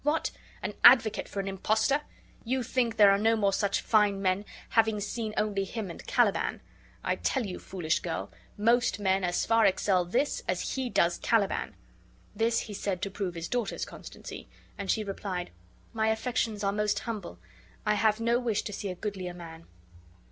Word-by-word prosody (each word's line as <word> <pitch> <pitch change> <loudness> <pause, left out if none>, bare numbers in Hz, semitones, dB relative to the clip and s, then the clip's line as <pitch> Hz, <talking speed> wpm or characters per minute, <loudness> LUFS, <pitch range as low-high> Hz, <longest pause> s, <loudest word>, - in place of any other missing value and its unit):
What! 295 +3 +1 0.3
an - - -2
advocate 225 -5 +6
for 200 - -5
an 195 - -6
impostor! 220 +8 +1 0.4
You 255 +2 -1
think 235 -1 0
there 205 -2 +8
are 195 - +3
no 225 +2 +3
more 200 -3 +2
such 200 0 +1
fine 210 -3 +3
men, 195 +1 0 0.2
having 220 -2 +3
seen 215 +2 -3
only 205 -2 +1
him 200 -1 -5
and - - -10
Caliban. - - +1 0.4
I - - 0
tell 260 -4 0
you, 185 -3 -5
foolish 175 -4 -1
girl, - - -4 0.3
most 230 +3 +3
men 190 -1 +1
as 175 -1 0
far 225 0 +5
excel 190 -1 +2
this 245 +12 0
as - - -1
he 260 -2 -2
does 170 -5 +2
Calliban." 210 -4 +1 0.6
This 230 +2 +2
he 215 - -7
said 195 -2 -2
to 200 - -2
prove 190 -3 -3
his 165 0 -4
daughter's 240 -4 -2
constancy; - - -10 0.3
and - - -6
she 220 - +2
replied: 195 -3 -4 0.4
"My 220 -1 +1
affections 220 -2 -1
are 195 - +2
most 210 0 +1
humble. 215 - -5 0.5
I 210 - +3
have 215 0 +2
no 235 +1 +2
wish 230 -4 0
to 210 - -5
see 200 0 -4
a 180 - -4
goodlier 185 -2 -5
man." 165 -1 -10
210 Hz, 180 wpm, -29 LUFS, 195-225 Hz, 0.6 s, there